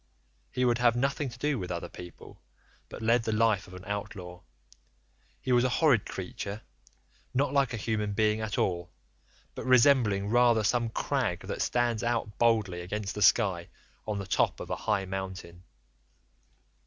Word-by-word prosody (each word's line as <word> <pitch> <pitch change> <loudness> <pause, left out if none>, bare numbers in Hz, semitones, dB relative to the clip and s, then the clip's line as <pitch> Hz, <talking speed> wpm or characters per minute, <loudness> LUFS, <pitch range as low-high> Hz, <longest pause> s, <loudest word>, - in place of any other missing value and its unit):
He 125 0 0
would 120 -1 +2
have 120 -1 +4
nothing 135 +2 0
to 120 - -11
do 145 -1 0
with 90 - -5
other 85 -1 -4
people, 90 -1 -12 0.5
but - - -8
led 115 +2 +3
the 115 - -2
life 110 -3 +2
of 90 - -11
an 90 0 -11
outlaw. 100 -3 -6 1.0
He 130 - -3
was 120 0 +4
a 130 - +2
horrid 130 -5 +3
creature, 100 +3 -6 0.7
not 140 +1 +1
like 140 -2 +2
a 115 - -3
human 105 -1 -2
being 110 +1 +1
at 110 -1 -3
all, 85 -2 -1 0.6
but - - -6
resembling 120 -6 +4
rather 120 -2 +4
some 115 +3 +1
crag - - -1
that - - -5
stands 120 -2 +1
out 115 -3 -2
boldly 110 -7 +2
against 105 +3 -4
the 105 - -5
sky 100 -4 +3 0.4
on 105 -1 -2
the 100 - -4
top 95 - +1
of - - -7
a - - +1
high 105 -3 -1
mountain. 95 -2 -6
110 Hz, 165 wpm, -29 LUFS, 95-120 Hz, 1.0 s, have